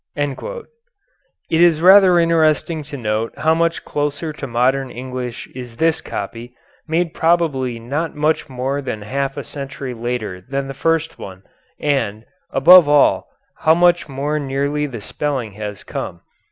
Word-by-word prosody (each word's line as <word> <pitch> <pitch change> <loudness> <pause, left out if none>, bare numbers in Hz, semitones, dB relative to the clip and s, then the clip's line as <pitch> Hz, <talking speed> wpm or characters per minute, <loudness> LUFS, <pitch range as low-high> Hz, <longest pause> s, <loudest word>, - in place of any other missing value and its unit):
It 145 - -4 1.0
is 170 -3 +5
rather 185 +1 +7
interesting 165 -1 +2
to 145 - -6
note 110 -1 -2
how 160 +1 +2
much 165 0 0
closer 145 +2 -2
to 145 -2 -6
modern 130 +3 +1
English 125 -1 -6
is 125 -3 -9
this 165 +2 +1
copy, 115 +4 -6 0.3
made 165 +1 0
probably 155 -8 +1
not 145 +8 -3
much 150 0 0
more 135 +2 -2
than 110 -6 -5
half 135 +5 -3
a - - -4
century 140 -2 -6
later 115 -5 -4
than 135 +6 -4
the 135 - -5
first 165 +3 -1
one 95 0 -9 0.4
and, 120 -7 -1 0.2
above 165 +3 +7
all, 145 -1 +4 0.3
how 160 +1 +4
much 175 -2 +3
more 145 +3 -2
nearly 140 +1 -1
the 120 -6 -7
spelling 130 -1 -3
has 105 0 -7
come. 85 - -6
140 Hz, 145 wpm, -19 LUFS, 125-160 Hz, 1.0 s, rather